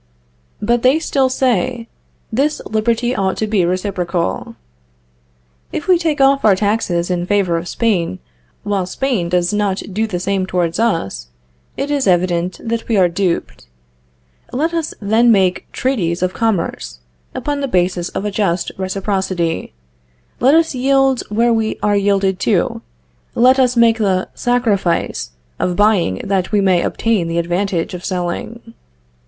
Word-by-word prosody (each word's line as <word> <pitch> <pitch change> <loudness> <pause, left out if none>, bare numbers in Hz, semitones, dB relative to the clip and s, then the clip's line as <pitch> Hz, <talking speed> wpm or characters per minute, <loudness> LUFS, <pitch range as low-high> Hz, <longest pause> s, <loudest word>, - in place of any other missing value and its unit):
But 235 +3 +2
they 255 +5 +4
still 270 -5 +1
say, 250 -2 0 0.5
this 285 +6 +1
liberty 230 +3 0
ought 190 -1 0
to 220 - 0
be 210 -4 +1
reciprocal. 180 - -2 1.2
If 300 - -4
we 365 -2 +5
take 315 -4 -1
off 275 0 +4
our 210 -3 +5
taxes 190 -4 0
in 175 0 -1
favor 195 -4 +1
of 165 +1 -3
Spain, 180 - 0 0.5
while 200 -3 -1
Spain 225 -6 -1
does 175 +1 +1
not 205 -2 0
do 220 +3 0
the 180 -5 -3
same 190 0 -1
towards 175 -1 -1
us, 100 - -1 0.5
it 280 +1 -2
is 280 -5 0
evident 180 -1 +1
that 230 0 -3
we 225 - +1
are 185 -2 +5
duped. 170 - -2 0.8
Let 315 +6 -1
us 330 -2 -2
then 225 +3 +3
make 190 -4 +1
treaties 185 -10 -1
of 185 0 0
commerce 170 - -2 0.4
upon 290 -1 -2
the 275 - -1
basis 180 -4 0
of 200 - -4
a 210 - -1
just 190 -4 -1
reciprocity; 190 - -2 0.7
let 265 +5 +5
us 325 -1 +3
yield 270 0 +2
where 230 +3 +2
we 220 -1 -1
are 205 -1 +2
yielded 195 -2 +1
to; - - 0 0.5
let 255 +3 +5
us 250 -1 +2
make 230 -1 +4
the 190 -3 0
sacrifice 205 - 0 0.3
of 180 - 0
buying 200 - +2
that 190 -1 -1
we 210 - +3
may 185 -3 +3
obtain 215 -5 0
the 165 0 -2
advantage 175 +1 -1
of 180 0 -7
selling. 195 +6 -4
200 Hz, 150 wpm, -17 LUFS, 180-235 Hz, 1.2 s, we